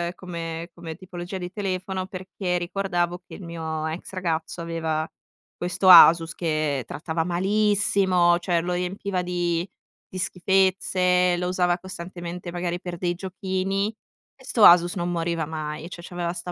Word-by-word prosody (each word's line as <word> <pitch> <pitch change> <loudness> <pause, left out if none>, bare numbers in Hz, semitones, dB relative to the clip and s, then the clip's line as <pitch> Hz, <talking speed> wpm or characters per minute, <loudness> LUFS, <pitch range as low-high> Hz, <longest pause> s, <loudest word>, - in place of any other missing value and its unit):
come 170 -1 -6
come 165 -2 -8
tipologia 180 +1 -7
di 180 -1 -6
telefono 190 -2 -3
perché 185 -1 -3
ricordavo 175 -1 -1
che - - -10
il 200 - -10
mio 160 -2 -4
ex 160 +4 -5
ragazzo 170 -2 -2
aveva 160 -1 -2 0.5
questo 180 +2 +1
Asus 165 -1 +9
che 155 -7 -1
trattava 160 +1 -3
malissimo, 190 -1 +2
cioè 175 -1 0
lo 180 0 -2
riempiva 180 +1 -2
di 175 0 -1 0.4
di 185 - -9
schifezze, 180 -1 +2
lo 180 0 -1
usava 180 -1 +1
costantemente 175 -1 -7
magari 175 0 -3
per 175 -1 -6
dei 175 0 -1
giochini 190 +3 -2 0.4
e 265 - -20
'sto 235 -4 +1
Asus 175 +1 +7
non 175 -1 -2
moriva 170 -2 -1
mai, 155 +1 -5
cioè 175 - -9
c'aveva 175 -1 -3
sta 180 0 -6
175 Hz, 145 wpm, -24 LUFS, 170-185 Hz, 0.5 s, Asus